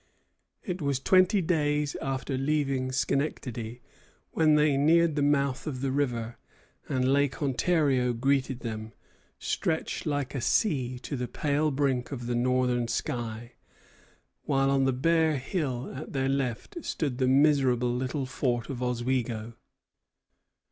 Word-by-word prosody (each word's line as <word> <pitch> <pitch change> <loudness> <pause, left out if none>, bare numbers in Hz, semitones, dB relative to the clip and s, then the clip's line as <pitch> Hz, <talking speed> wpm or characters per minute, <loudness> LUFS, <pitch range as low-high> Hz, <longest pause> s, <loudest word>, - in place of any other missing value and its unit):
It 180 -2 -4
was 140 -3 0
twenty 185 +6 +4
days 150 -3 0
after 135 0 -2
leaving 135 -2 0
Schenectady 125 -3 -2 0.5
when 155 -2 +4
they 150 -1 +3
neared 160 +3 +4
the 145 - 0
mouth 140 -1 +1
of 130 -4 -4
the 135 -1 0
river; 120 -4 -1 0.5
and 130 0 +2
Lake 140 -1 +1
Ontario 135 -2 +2
greeted 130 +1 0
them, 110 -1 -5 0.4
stretched 160 0 -2
like 145 -3 -1
a 135 - -3
sea 130 - +1
to 145 - -4
the 125 -1 -3
pale 150 +4 0
brink 135 -3 0
of 125 -4 -5
the 120 - -1
northern 125 0 +1
sky, 115 0 -3 0.9
while 135 -1 +1
on 135 -1 +3
the 135 - +3
bare 160 +3 +2
hill 135 -3 -3
at 140 +4 -8
their 135 -1 0
left 135 - -2
stood 140 -6 -2
the 130 - +2
miserable 130 -3 +3
little 130 +3 -2
fort 125 -1 -2
of 125 -2 -6
Oswego. 120 -2 -1
135 Hz, 135 wpm, -28 LUFS, 125-145 Hz, 0.9 s, twenty